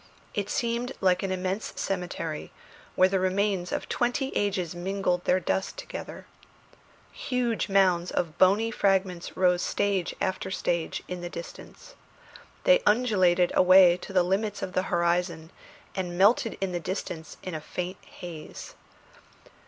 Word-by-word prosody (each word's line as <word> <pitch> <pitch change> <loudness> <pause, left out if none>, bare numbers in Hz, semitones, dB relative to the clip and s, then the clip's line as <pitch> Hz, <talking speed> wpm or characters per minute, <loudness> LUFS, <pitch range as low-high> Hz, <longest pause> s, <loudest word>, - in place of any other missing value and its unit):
It 205 -1 -2
seemed 240 +1 -1
like 185 -2 +3
an 195 - -2
immense 185 +3 -2
cemetery, 175 -4 -3 0.4
where 185 - +6
the 190 0 0
remains 185 -1 0
of - - -3
twenty 250 +3 -1
ages 190 -5 0
mingled 180 0 -1
their 185 - +3
dust 190 - -2
together. - - -8 0.9
Huge 245 -5 -1
mounds 185 -3 +3
of 170 -1 -2
bony 205 +5 +4
fragments 190 -4 0
rose 180 -1 +3
stage 195 -4 0
after 190 0 -2
stage 170 -3 -2
in 180 -1 -5
the 175 - -5
distance. 175 - -10 0.7
They - - +5
undulated 185 -7 +3
away 185 -1 +7
to 180 - -10
the 185 -2 +4
limits 200 +3 -1
of 185 - -4
the 185 - +2
horizon, 170 -1 0 0.4
and 180 -2 -4
melted 215 +4 +3
in 195 -1 -1
the 175 - -2
distance 170 -2 -5
in 185 - -5
a 155 - -4
faint 180 +4 -5
haze. 165 -3 -9
185 Hz, 140 wpm, -27 LUFS, 175-200 Hz, 0.9 s, away